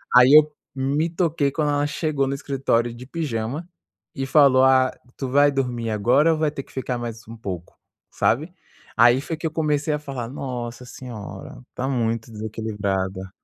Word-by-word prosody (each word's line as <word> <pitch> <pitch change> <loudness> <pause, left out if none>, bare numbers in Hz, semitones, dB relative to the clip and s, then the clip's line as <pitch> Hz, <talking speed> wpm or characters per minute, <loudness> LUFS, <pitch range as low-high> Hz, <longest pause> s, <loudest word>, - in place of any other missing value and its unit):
aí, 125 +2 +8
eu 155 0 +8 0.3
me 140 +5 0
toquei 165 -4 0
quando 150 0 0
ela 145 0 +1
chegou 150 -2 -1
no 135 - -1
escritório 125 -4 0
de 125 +2 -10
pijama 140 0 -3 0.5
e 135 - -2
falou: 135 -2 +5
"Ah, 130 -1 +5 0.3
tu 135 - -3
vai 145 +2 +5
dormir 125 -4 -2
agora 120 +10 +3
ou 155 - -3
vai 155 -1 +2
ter 140 -2 -6
que - - -21
ficar 130 -1 -3
mais 115 -2 -6
um 115 - -9
pouco?". 90 -5 -6 0.4
Sabe? 155 +9 0 0.4
Aí, 120 +2 +6
foi 160 +3 -4
que 160 - -7
eu - - -5
comecei 150 -1 0
a 150 - -1
falar: 130 -5 -6
"Nossa 125 -2 -5
senhora, 110 -4 -9
tá 130 +1 -2
muito 115 -3 -1
desequilibrada". 100 -3 -3
130 Hz, 175 wpm, -23 LUFS, 115-145 Hz, 0.5 s, aí